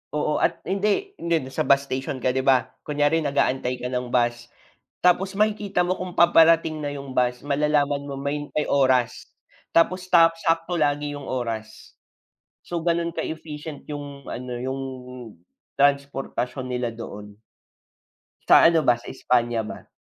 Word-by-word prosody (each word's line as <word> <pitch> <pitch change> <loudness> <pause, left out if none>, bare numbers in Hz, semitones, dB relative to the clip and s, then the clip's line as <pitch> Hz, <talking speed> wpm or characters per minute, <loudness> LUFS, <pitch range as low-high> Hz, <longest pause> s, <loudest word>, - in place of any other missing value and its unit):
oo, 150 0 0
at - - 0
hindi, 210 - 0
hindi, 165 -6 -1
sa 130 - -2
bus 140 0 +5
station 130 0 -4
ka 130 - +3
'di 130 - -1
ba 130 -2 +5 0.2
kunyari 150 +2 +1
nag-aantay 135 -3 0
ka 125 - -4
ng 125 -1 -2
bus, 120 0 0 0.6
tapos 190 +2 +3
makikita 205 -3 +1
mo 180 +1 0
kung 180 -1 -6
paparating 165 -2 +5
na 145 -1 -3
yung 140 -1 -8
bus 125 +1 0
malalaman 145 0 +1
mo 140 - -5
may 145 +1 -3
may 150 - 0
oras, 130 -3 +2 0.5
tapos 185 +2 +2
ta 165 -2 +6
sakto 165 +1 0
lagi 145 -1 0
yung 145 -1 -8
oras. 115 -3 -5 0.7
So 170 -1 -3
ganun 170 0 0
ka-efficient 155 -2 -6
yung 145 -1 -7
ano 125 0 -5
yung 130 +2 -4 1.0
transportasyon 140 -2 0
nila 125 -1 -1
doon. 105 -3 -9 1.1
Sa - - +9
ano 165 -1 +5
ba, 120 -1 +5
sa 120 - -11
Espanya 120 -2 +1
ba? - - -10
145 Hz, 145 wpm, -24 LUFS, 125-165 Hz, 1.1 s, Sa